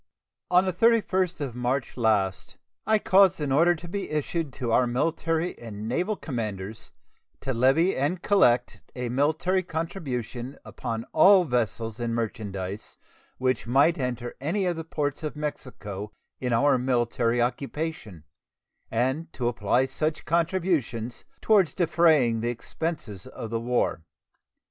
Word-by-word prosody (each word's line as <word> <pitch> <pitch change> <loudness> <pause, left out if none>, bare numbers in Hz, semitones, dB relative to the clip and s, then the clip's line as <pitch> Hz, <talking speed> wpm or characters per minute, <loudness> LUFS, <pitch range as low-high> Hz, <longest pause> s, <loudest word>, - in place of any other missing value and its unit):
On 180 +1 +5
the 185 - 0
31st 190 -5 +2
of 135 -4 -3
March 125 +1 -1
last 105 -5 0 0.3
I 220 - +5
caused 190 -3 +4
an 145 -3 -2
order 170 +5 +4
to 175 +2 -10
be 200 +3 -4
issued 155 0 -2
to 125 -4 -3
our 125 +2 +4
military 165 +6 0
and 110 -2 -7
naval 180 - 0
commanders 110 - -5 0.5
to 135 - -2
levy 135 +10 +3
and 150 +7 -1
collect 125 -12 +3
a 125 -1 -3
military 160 +8 +1
contribution 140 - -4
upon 115 -1 -5
all 185 +4 +7
vessels 115 - -2
and 115 -1 -1
merchandise 100 -3 -4 0.4
which 130 -2 0
might 140 +7 +4
enter 120 -2 -3
any 185 +7 0
of 175 -1 0
the 165 - -5
ports 145 -3 -3
of 155 -1 -4
Mexico 105 -9 -6 0.3
in 125 -1 -2
our 130 +3 +3
military 120 -1 +1
occupation, 130 - -3 0.7
and 130 +8 -1
to 120 - -2
apply 120 +2 +1
such 155 +4 -2
contributions 165 - -1 0.2
toward 205 -5 +5
defraying 155 -9 +3
the 120 - 0
expenses 120 - -5
of 115 - -7
the 115 - 0
war. 120 -7 0
130 Hz, 135 wpm, -26 LUFS, 120-165 Hz, 0.7 s, all